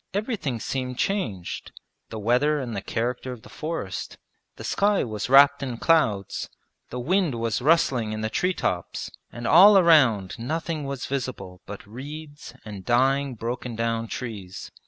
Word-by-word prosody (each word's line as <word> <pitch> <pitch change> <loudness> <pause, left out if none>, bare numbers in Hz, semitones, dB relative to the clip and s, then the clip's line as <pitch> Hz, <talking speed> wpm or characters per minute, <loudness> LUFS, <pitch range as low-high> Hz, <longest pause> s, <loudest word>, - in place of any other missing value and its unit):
Everything 205 - -2
seemed 125 +1 -3
changed 115 - -2 0.4
the 110 - -6
weather 125 +8 +2
and 120 -5 -4
the 100 - -3
character 120 +4 -3
of 125 -3 -9
the - - -13
forest; 155 - -5 0.4
the - - -10
sky 205 0 +2
was 110 0 -4
wrapped 140 +2 +7
in 130 -4 -4
clouds, 115 - +1 0.4
the 125 - -5
wind 170 +1 +1
was 115 0 -1
rustling 130 -7 +2
in 110 0 -4
the 110 - -1
tree 185 0 0
tops, 90 -1 -3 0.2
and 120 0 -7
all 195 - +8
around 130 - +4
nothing 155 +4 -3
was 140 -2 -4
visible 110 -9 -5
but 105 - -8
reeds 145 +7 -9
and 100 -3 -8
dying 135 +3 +2
broken 120 +1 -4
down 115 0 -1
trees. 105 -7 -7
125 Hz, 155 wpm, -25 LUFS, 110-150 Hz, 0.4 s, all